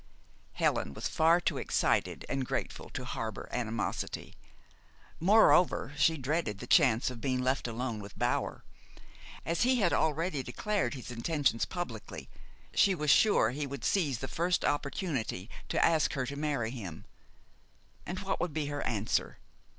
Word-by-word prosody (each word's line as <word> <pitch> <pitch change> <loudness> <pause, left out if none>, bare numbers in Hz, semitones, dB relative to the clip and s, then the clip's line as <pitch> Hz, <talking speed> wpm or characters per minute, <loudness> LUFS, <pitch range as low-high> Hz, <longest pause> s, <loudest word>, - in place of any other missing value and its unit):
Helen 70 - 0
was - - -2
far 165 +2 +4
too 175 - -1
excited - - 0
and 135 - -1
grateful - - -4
to - - -6
harbor - - -4
animosity. 115 -2 -3 0.9
Moreover, 180 -5 +4
she 160 +2 +3
dreaded 135 - -1
the - - -7
chance 115 +3 +4
of 120 -2 -9
being 130 -2 0
left 130 0 0
alone 115 -1 -3
with 100 0 -10
Bower. - - -1 0.8
As 170 - -1
he 255 +2 +4
had 200 -8 +2
already 160 -1 +1
declared 200 +9 -1
his 125 -1 -8
intentions 125 0 +1
publicly, 175 - -6 0.4
she 195 -2 +4
was 150 -3 +2
sure 205 - +5
he 145 +2 -3
would 140 0 -6
seize 150 -10 +1
the 135 - -5
first 175 +4 0
opportunity 140 - -2 0.2
to - - +3
ask 160 -2 +2
her 130 -3 -1
to 140 +2 -5
marry 140 -6 -1
him. 95 -11 -7 1.0
And 185 +2 -5
what 195 -1 -2
would 175 -4 -2
be 155 -2 0
her 145 - -2
answer? 110 -1 -1
140 Hz, 150 wpm, -31 LUFS, 120-170 Hz, 1.0 s, sure